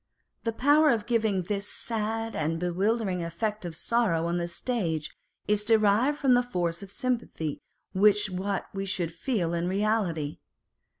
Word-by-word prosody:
The 230 - +1
power 290 +6 +4
of 225 -6 +1
giving 220 -5 +1
this 200 +2 -3
sad 225 0 -3
and 160 +1 -1
bewildering 185 +1 0
effect 210 +4 -3
of 170 -2 -5
sorrow 185 -4 +1
on 170 +1 0
the 170 - -2
stage 170 - -2 0.3
is 210 0 +2
derived 220 +5 +3
from 265 -3 +4
the 245 - +5
force 175 -8 -2
of 200 - -9
sympathy 215 - -2 0.3
with 205 +1 +4
what 190 +2 -2
we 195 0 -3
should 175 -3 -1
feel 175 -4 -1
in 170 +1 0
reality. 190 -7 0
200 Hz, 155 wpm, -28 LUFS, 175-225 Hz, 0.3 s, the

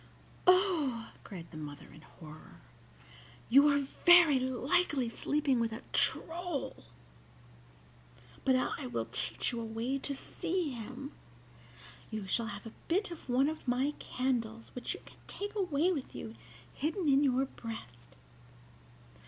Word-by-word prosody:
"Oh!" 335 - +3
cried 180 -6 -8
the 160 - -9
mother, 145 -2 -7
in 155 - -14
horror, 155 - -13 0.9
"you 280 +4 +8
are 285 -1 +4
very 320 +1 +6
likely 260 +2 +1
sleeping 285 +1 +1
with 230 -1 +1
a 220 - -6
troll! 340 -3 0 1.6
But 260 - +4
I 255 - -1
will 115 -2 -2
teach 130 - 0
you 235 -1 -3
a - - -4
way 230 +5 -2
to 280 +1 -3
see 345 +2 -2
him. 250 +4 -7 1.0
You 215 -3 -4
shall 225 +4 0
have 205 0 -7
a 225 - -8
bit 370 +3 +1
of 330 -5 -9
one 260 +3 +4
of 310 -3 -4
my 260 +4 +1
candles, 230 -3 -2
which 250 - -3
you - - -11
can - - -15
take 410 +1 -5
away 360 -4 +2
with 285 -7 -4
you 220 - -6 0.4
hidden 320 +4 -1
in 280 0 +5
your 265 -1 +3
breast. 120 - -9
260 Hz, 140 wpm, -32 LUFS, 225-310 Hz, 1.6 s, you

